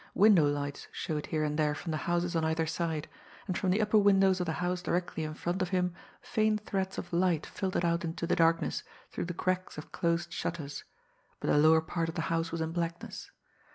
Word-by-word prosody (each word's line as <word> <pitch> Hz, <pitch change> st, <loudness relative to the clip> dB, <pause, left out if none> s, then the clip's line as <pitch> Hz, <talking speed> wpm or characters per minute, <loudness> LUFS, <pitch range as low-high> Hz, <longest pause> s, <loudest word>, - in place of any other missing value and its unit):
Window 195 Hz, -7 st, +6 dB
lights 145 Hz, -1 st, -3 dB
showed 150 Hz, -2 st, -3 dB
here 155 Hz, -1 st, 0 dB
and 150 Hz, 0 st, -1 dB
there 150 Hz, -1 st, +2 dB
from 165 Hz, -, -5 dB
the 155 Hz, -, 0 dB
houses 175 Hz, 0 st, +1 dB
on 165 Hz, -, +2 dB
either 160 Hz, 0 st, +1 dB
side; 160 Hz, -1 st, -2 dB, 0.4 s
and 185 Hz, -, -2 dB
from 190 Hz, -, 0 dB
the 190 Hz, +4 st, +3 dB
upper 215 Hz, 0 st, +4 dB
windows 195 Hz, -2 st, +4 dB
of 180 Hz, -, -1 dB
the 160 Hz, -, 0 dB
house 180 Hz, +1 st, -1 dB
directly 175 Hz, -2 st, -1 dB
in 155 Hz, 0 st, -4 dB
front 175 Hz, +4 st, -2 dB
of 185 Hz, -, 0 dB
him 180 Hz, -1 st, +1 dB, 0.3 s
faint 215 Hz, -1 st, +1 dB
threads 190 Hz, -1 st, -2 dB
of 175 Hz, -, -6 dB
light 170 Hz, -3 st, +2 dB
filtered 185 Hz, -3 st, -2 dB
out 170 Hz, +2 st, +1 dB
into 165 Hz, 0 st, -3 dB
the -, -, +1 dB
darkness 165 Hz, 0 st, +2 dB, 0.3 s
through -, -, -3 dB
the 175 Hz, -, -4 dB
cracks 185 Hz, -1 st, -1 dB
of 150 Hz, -, -8 dB
closed 170 Hz, 0 st, 0 dB
shutters, 150 Hz, -6 st, -4 dB, 0.5 s
but -, -, 0 dB
the -, -, +4 dB
lower 160 Hz, +1 st, +6 dB
part 165 Hz, +1 st, -2 dB
of 165 Hz, -, -6 dB
the 165 Hz, -, -1 dB
house 165 Hz, 0 st, 0 dB
was 165 Hz, 0 st, -3 dB
in 160 Hz, 0 st, -1 dB
blackness. 170 Hz, 0 st, -4 dB
170 Hz, 220 wpm, -31 LUFS, 160-185 Hz, 0.5 s, Window